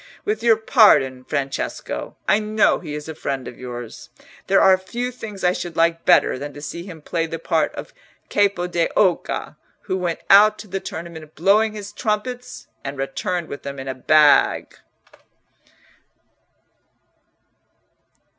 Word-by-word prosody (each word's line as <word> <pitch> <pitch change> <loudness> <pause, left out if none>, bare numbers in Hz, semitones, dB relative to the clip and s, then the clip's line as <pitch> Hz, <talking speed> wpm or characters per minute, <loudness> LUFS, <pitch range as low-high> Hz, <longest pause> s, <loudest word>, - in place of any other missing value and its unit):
With 215 +1 -1
your 230 -1 +4
pardon, 145 - +4
Francesco—I 140 +8 -2
know 215 0 +2
he 150 -4 -7
is 150 +1 -7
a 160 - -5
friend 135 -4 -4
of - - -10
yours—there 125 - -4
are 190 -1 +6
few 240 +7 -4
things 210 -6 -9
I 180 0 +3
should 175 -3 -6
like 165 0 +1
better - - +4
than 145 +1 -7
to 145 - -9
see 170 - -6
him 165 -5 -11
play 165 0 -2
the 165 - -5
part 165 - 0
of - - -8 0.3
Capo 200 -3 +1
d'Oca, 180 +1 0 0.2
who 185 - -3
went 175 -3 -2
out 210 +2 +7
to 215 - -10
the 195 0 -3
tournament 160 -3 -8
blowing 210 +5 +3
his 205 -1 -8
trumpets 245 +3 -3 0.2
and 140 0 -6
returned 160 +6 -3
with 140 - -7
them 140 0 -7
in 135 0 -7
a 130 - -2
bag." 150 +3 +3
175 Hz, 145 wpm, -21 LUFS, 150-210 Hz, 0.3 s, out